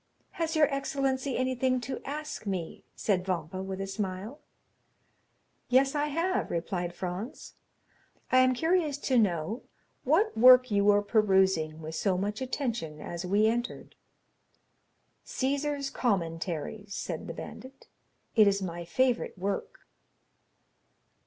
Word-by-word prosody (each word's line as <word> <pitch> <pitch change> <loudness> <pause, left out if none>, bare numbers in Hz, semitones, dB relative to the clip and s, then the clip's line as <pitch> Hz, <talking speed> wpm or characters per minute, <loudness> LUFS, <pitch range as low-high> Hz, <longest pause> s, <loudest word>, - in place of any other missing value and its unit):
"Has 330 -1 -2
your 310 -1 +6
excellency 275 -1 -1
anything 255 0 +1
to 260 +1 -5
ask 300 -5 -5
me?" 185 -4 -4
said 190 -4 0
Vampa 185 0 -3
with 190 0 -5
a 195 - -2
smile. 195 +6 -4 1.3
"Yes, 270 +2 +4
I 295 0 0
have," 335 +5 0
replied 175 +1 -3
Franz; 185 +8 -6 0.8
"I 255 - +6
am 255 0 +4
curious 320 -1 +1
to 260 -3 +2
know 190 - 0 0.4
what 345 - +2
work 255 +1 +7
you 200 -1 +3
were 205 0 +5
perusing 190 -7 +2
with 160 +1 -6
so 185 +3 0
much 205 +4 -2
attention 235 - -3
as 170 +3 -5
we 205 +3 +3
entered." 240 +2 -2 1.3
"Cæsar's 280 +1 -1
Commentaries," 185 - -2
said - - -4
the - - -5
bandit, 265 +1 -10 0.5
"it 215 -3 +7
is 200 0 +3
my 175 -3 -4
favorite 250 +3 0
work." 200 - -3
215 Hz, 125 wpm, -29 LUFS, 185-265 Hz, 1.3 s, work